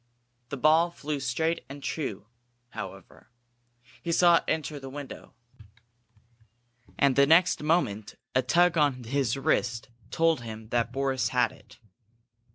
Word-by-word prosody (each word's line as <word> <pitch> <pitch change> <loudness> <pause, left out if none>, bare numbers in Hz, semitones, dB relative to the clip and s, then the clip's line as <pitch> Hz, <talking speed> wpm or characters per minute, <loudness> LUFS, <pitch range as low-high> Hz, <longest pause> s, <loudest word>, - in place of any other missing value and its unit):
The 140 - -4
ball 160 +5 +4
flew 150 -3 -5
straight 160 +6 -1
and 140 0 -9
true, 125 -11 -4 0.4
however. - - -10 0.7
He 170 - -3
saw 170 0 +5
it - - -4
enter 155 -2 -2
the 135 -1 -9
window. 140 0 -9 1.6
And 140 -2 +3
the 140 0 +5
next 175 +4 +4
moment 130 - 0 0.2
a 130 - +3
tug 170 +6 +3
on 140 -4 +1
his 130 0 -1
wrist 125 -5 0 0.2
told 165 -5 +2
him 110 -1 -9
that 120 -1 0
Boris 135 0 0
had 125 -1 +1
it. - - -18
140 Hz, 135 wpm, -27 LUFS, 125-160 Hz, 1.6 s, saw